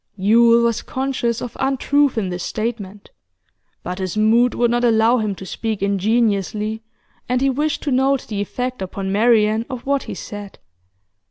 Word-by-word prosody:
Yule 230 +4 +5
was 235 -1 +1
conscious 260 -3 -2
of 245 - -7
untruth 275 0 +1
in 200 -4 -1
this 180 0 -4
statement, 210 -3 -5 0.7
but 180 +2 -5
his 185 +1 -3
mood 230 +3 +3
would 240 -1 +2
not 240 0 +1
allow 230 +1 +4
him 210 -2 -2
to 190 - -9
speak 220 +1 -4
ingenuously, 210 +1 0 0.5
and 250 0 +1
he 270 +1 +2
wished 295 +3 -1
to 290 - -1
note 265 +1 +2
the 205 -2 -3
effect 250 +3 -4
upon 190 +1 -4
Marian 220 0 +3
of 255 -3 -6
what 280 0 +1
he - - -4
said. 205 -1 -8
225 Hz, 165 wpm, -20 LUFS, 205-250 Hz, 0.7 s, Yule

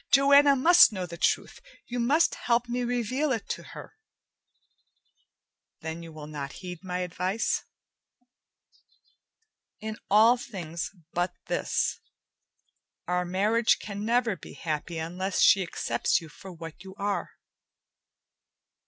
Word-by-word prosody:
"Joanna 280 +1 +6
must 345 +4 +7
know 185 -3 -4
the 170 -1 -8
truth. - - 0 0.2
You 245 0 -4
must 285 +8 +3
help 240 0 0
me 245 +1 -2
reveal 245 +4 -1
it 230 -5 -2
to - - -3
her." - - -11 1.9
"Then 160 +1 -5
you 165 -1 -10
will 155 -1 -9
not 145 -2 -6
heed 180 -2 -8
my 180 -1 -3
advice?" 180 +4 -1 2.2
"In 220 0 -5
all 225 +4 +6
things 175 -9 -5 0.2
but 175 +1 -1
this. - - -1 1.1
Our 180 0 0
marriage 210 +6 +2
can 205 0 -6
never 230 -1 +1
be - - -12
happy 160 +1 -4
unless 180 +3 -3
she 195 - +6
accepts 170 -4 0
you 165 - -12
for 190 +5 -11
what 165 0 -10
you 190 0 -11
are." 200 0 -2
195 Hz, 125 wpm, -27 LUFS, 170-240 Hz, 2.2 s, must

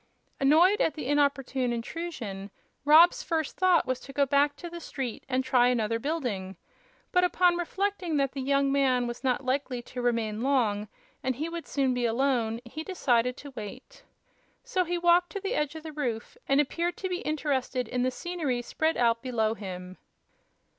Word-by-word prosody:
Annoyed 330 +9 +5
at 320 - +1
the 305 - -5
inopportune 275 -3 +1
intrusion, 230 - -5 0.4
Rob's 320 +4 +7
first 320 -3 -2
thought 370 -2 +4
was 255 -1 -1
to 275 - -11
go 280 0 +3
back 285 +1 +2
to 345 - -8
the 340 0 -7
street 265 -7 -5
and 260 0 +1
try 250 -1 +4
another 230 -2 +1
building; 230 - -3 0.5
but, 360 -1 +3
upon 360 0 +3
reflecting 360 -1 -1
that 275 -1 +1
the 270 - -5
young 275 +1 +2
man 260 -3 +2
was 240 +2 -6
not 260 0 0
likely 260 -1 -1
to 250 +1 -6
remain 230 -3 0
long 230 -6 +1 0.3
and 260 -1 -1
he 310 +6 -3
would 335 -1 -6
soon 270 -3 +1
be 245 -1 0
alone, 235 -2 0
he 310 +7 -6
decided 250 -9 +1
to 285 - -10
wait. 225 +1 -9 0.6
So 450 -8 0
he 350 +1 -1
walked 345 0 +4
to 400 - -3
the 395 +4 -3
edge 300 - -1
of 315 - -8
the 315 -1 -7
roof 245 - -3
and 275 +1 +3
appeared 340 +4 0
to 380 - -3
be 360 -1 -2
interested 270 -5 -1
in 250 +2 -2
the 255 - +2
scenery 280 -4 -3
spread 315 +6 0
out 230 -1 +2
below 225 -4 0
him. 185 -3 -8
275 Hz, 180 wpm, -28 LUFS, 245-320 Hz, 0.6 s, Rob's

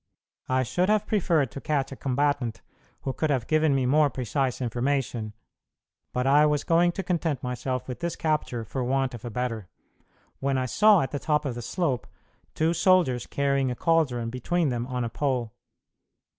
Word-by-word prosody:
I 130 0 +2
should 180 - 0
have 215 0 +2
preferred 165 - +1
to 140 - -7
catch 140 -3 -1
a - - -6
combatant 135 -3 -1 0.4
who 135 - -3
could 155 - -1
have 130 -5 0
given 155 0 +2
me 130 -2 +1
more 145 +3 +4
precise 130 0 -2
information; 120 -2 -1 0.8
but 125 0 -1
I 145 +3 +5
was 150 -1 +1
going 170 +1 +3
to 195 - -4
content 165 -7 -1
myself 125 0 -3
with 125 - -6
this 170 -1 -2
capture 150 -7 -1
for 130 +4 -3
want 135 +1 0
of 120 - -9
a - - -3
better, 115 -5 -3 0.7
when 135 0 0
I 130 - 0
saw, 210 - +5
at 135 - -3
the 145 - -3
top 150 0 0
of 135 - -1
the 120 - -6
slope, 140 -3 -2 0.5
two 160 +2 +2
soldiers 170 -9 +3
carrying 140 -1 +1
a 125 - -2
caldron 130 -8 +1
between 155 +6 0
them 120 -1 -2
on 125 -1 -2
a 115 - -2
pole. 120 -2 -1
135 Hz, 185 wpm, -26 LUFS, 125-155 Hz, 0.8 s, I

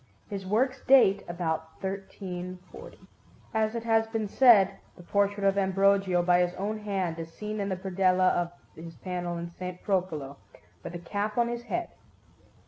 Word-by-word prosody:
His 195 -2 -5
works 255 +6 +1
date 205 -7 +6
about 160 -2 -3
1340. 185 -2 -7 0.6
As 220 0 +1
it 230 - -3
has 225 -1 +2
been 225 -1 -2
said, 210 -4 +5 0.2
the 175 - -12
portrait 200 +2 0
of 195 0 +3
Ambrogio, 195 -1 +3
by 175 0 +4
his 180 0 +1
own 210 +3 -3
hand, 190 -5 -2
is 165 0 -6
seen 210 +4 -5
in 200 0 -1
the 190 - -2
predella 185 -1 +2
of 175 -1 -1 0.2
his 165 +1 -10
panel 175 -2 -4
in 170 0 -6
S. 180 0 -4
Procolo, 165 -8 -1 0.5
with 175 - -7
a - - -2
cap 205 +5 -3
on 235 0 +3
his 240 0 -3
head. 350 +6 -2
195 Hz, 165 wpm, -28 LUFS, 175-210 Hz, 0.6 s, date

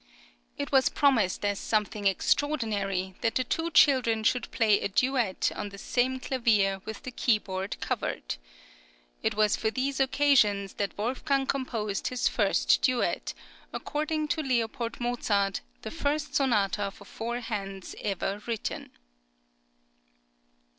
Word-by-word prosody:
It 140 - -4
was 265 -1 +5
promised 225 -10 +2
as 205 -1 0
something 210 -1 0
extraordinary 195 -5 0
that 225 - 0
the 255 - +2
two 325 +6 -1
children 250 -8 +4
should 245 +2 +1
play 215 -4 +3
a - - 0
duet 240 -1 +1
on 205 - -4
the 200 - -11
same 255 +5 0
clavier 215 -7 +1
with 220 - -7
the 255 - -6
keyboard 200 -5 -1
covered. - - -3 0.8
It - - 0
was 215 -1 +3
for 220 - 0
these 265 +4 -2
occasions 255 -8 +3
that 200 - -2
Wolfgang 265 +5 0
composed 230 -7 -2
his 250 -1 0
first - - +2
duet, 255 -2 0 0.4
according 305 +1 -2
to 315 - 0 0.3
L. 235 0 -4
Mozart, 210 -5 0 0.2
the - - -5
first 295 +1 -2
sonata 205 -6 +2
for 200 +1 -15
four 235 +4 -4
hands 195 -4 -5
ever 200 0 -2
written. 230 -3 -3
225 Hz, 130 wpm, -28 LUFS, 200-260 Hz, 0.8 s, was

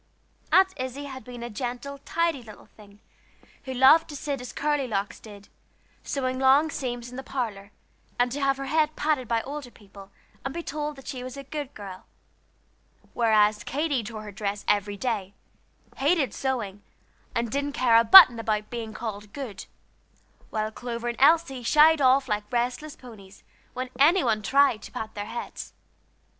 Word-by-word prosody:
Aunt 380 0 +5
Izzie 260 +2 -5
had 265 -3 -8
been 245 0 -9
a 240 - -5
gentle, 250 +4 -5
tidy 335 -5 0
little 215 -3 -13
thing, 205 -1 -19 0.6
who 260 - -4
loved 275 +7 +6
to 295 - -7
sit 280 -2 -4
as 250 - -7
Curly 295 -2 -1
Locks 200 -3 -3
did, 205 -2 -13 0.5
sewing 255 -2 -3
long 275 +4 +4
seams 245 -3 -5
in 250 - -9
the - - -4
parlor, 225 -7 -4 0.5
and 245 0 +1
to 285 +3 -4
have 275 0 +2
her 275 - -5
head 310 +2 +1
patted 295 -5 0
by 230 -1 0
older 285 -2 -7
people, 200 -3 -15 0.3
and 270 +2 -5
be 340 - -4
told 300 0 -4
that 270 - -14
she 255 -3 -5
was 255 +1 -8
a 275 - -7
good 285 0 -6
girl; 195 -3 -10 1.1
whereas 215 -2 +3
Katy 285 -2 -1
tore 215 0 -7
her 210 - -8
dress 200 0 -4
every 205 0 +1
day, 205 -5 -3 0.6
hated 290 -1 +1
sewing, 225 -7 -3 0.5
and 235 -1 -1
didn't 285 +2 -2
care 240 -4 +4
a 230 - +6
button 240 -2 +10
about 215 -1 -2
being 225 -2 -6
called 210 -2 -6
"good," 255 -9 -7 0.8
while 215 0 -2
Clover 240 +1 -5
and 235 +1 -6
Elsie 280 -3 +4
shied 305 +5 +5
off 265 +1 +4
like 210 -1 -3
restless 250 +5 -2
ponies 205 -7 -14 0.3
when 255 0 -4
any 335 +6 +5
one 220 -3 +1
tried 270 -1 +3
to - - -11
pat 220 0 -6
their 205 0 -5
heads. 235 - -7
250 Hz, 175 wpm, -26 LUFS, 215-280 Hz, 1.1 s, button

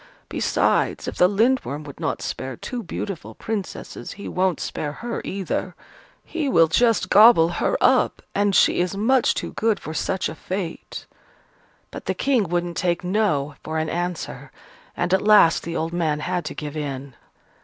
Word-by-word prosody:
Besides, - - +1
if - - -5
the 180 - +6
Lindworm 205 - +1
would 145 -2 -11
not - - -2
spare 130 -2 -5
two 250 -2 -5
beautiful 195 -5 -6
Princesses, 215 -4 -5
he 200 - -8
won't 185 -1 0
spare 145 -1 -4
her 235 +7 -5
either. 195 -2 -3 0.5
He 315 -4 -2
will 165 -9 +5
just 230 +7 +2
gobble 210 -6 +7
her - - 0
up: - - +3
and 205 -1 +1
she - - +4
is 180 +2 -1
much 250 +5 +3
too - - -4
good 225 -1 +1
for 155 - -7
such 190 +3 -1
a - - -5
fate." 180 +1 -5 0.9
But - - -8
the - - -1
King 245 -10 +1
wouldn't 175 0 -1
take 175 0 0
"No" 180 -7 0
for 160 0 -3
an 155 0 -1
answer: 175 +1 -4 0.5
and 175 +1 0
at 190 - +4
last 205 -6 +6
the 170 0 -5
old 165 +1 -2
man 155 -4 0
had 180 0 -2
to - - -5
give 150 0 -6
in. 140 -3 -5
180 Hz, 170 wpm, -23 LUFS, 160-210 Hz, 0.9 s, gobble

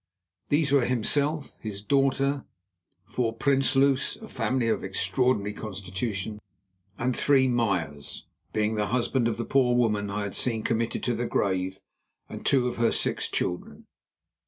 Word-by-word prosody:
These 145 -1 +2
were 140 -4 +4
himself, 140 +5 0
his 100 -2 -6
daughter, 135 +2 +2 0.6
four 115 +1 -1
Prinsloos—a 135 0 +2
family 120 0 0
of 110 - 0
extraordinary 100 +3 0
constitution—and 100 +1 -5
three 135 -2 +4
Meyers, 90 - -1 0.3
being 110 0 +1
the 105 -1 0
husband 125 0 +1
of 115 - -1
the 115 - -3
poor 125 -3 +3
woman 105 -4 +1
I 105 +1 -2
had 100 - -4
seen 115 -3 0
committed 115 -1 -1
to 125 - +1
the 120 +1 -2
grave 95 0 0 0.5
and - - -8
two 130 -3 +3
of 120 - -3
her 115 0 +3
six - - 0
children. 90 - -3
115 Hz, 135 wpm, -27 LUFS, 100-130 Hz, 0.6 s, were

